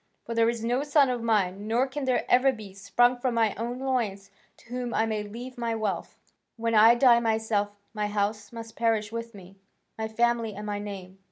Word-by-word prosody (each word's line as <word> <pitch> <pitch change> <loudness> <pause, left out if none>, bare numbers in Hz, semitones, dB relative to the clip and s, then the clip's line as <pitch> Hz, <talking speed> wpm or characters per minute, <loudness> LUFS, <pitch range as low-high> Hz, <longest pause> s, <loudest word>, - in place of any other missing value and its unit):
For 230 - -4
there 230 0 +3
is 235 -1 -3
no 245 +3 +1
son 290 -2 +3
of 245 -1 -3
mine, 205 -3 0
nor 235 +4 +2
can 270 +1 -5
there 255 -1 +1
ever 260 +2 +5
be, 215 -6 -10
sprung 240 +6 +2
from 245 -1 -1
my 225 -3 +2
own 235 +3 -4
loins, 235 -7 -2 0.3
to - - -21
whom 245 -1 -3
I 225 - +2
may 215 -1 -2
leave 240 +5 -8
my 230 -1 -1
wealth: 215 -3 -3 0.4
when 230 0 -1
I 225 +2 +7
die 240 -1 +6
myself, 220 -2 0 0.2
my 210 -1 -1
house 205 0 -2
must 230 -1 -9
perish 225 -2 0
with 230 -1 -6
me, 195 0 -13 0.4
my 220 - -1
family 230 -1 0
and 210 +1 -7
my 205 -1 -3
name. 195 -2 -8
225 Hz, 205 wpm, -27 LUFS, 210-240 Hz, 0.4 s, I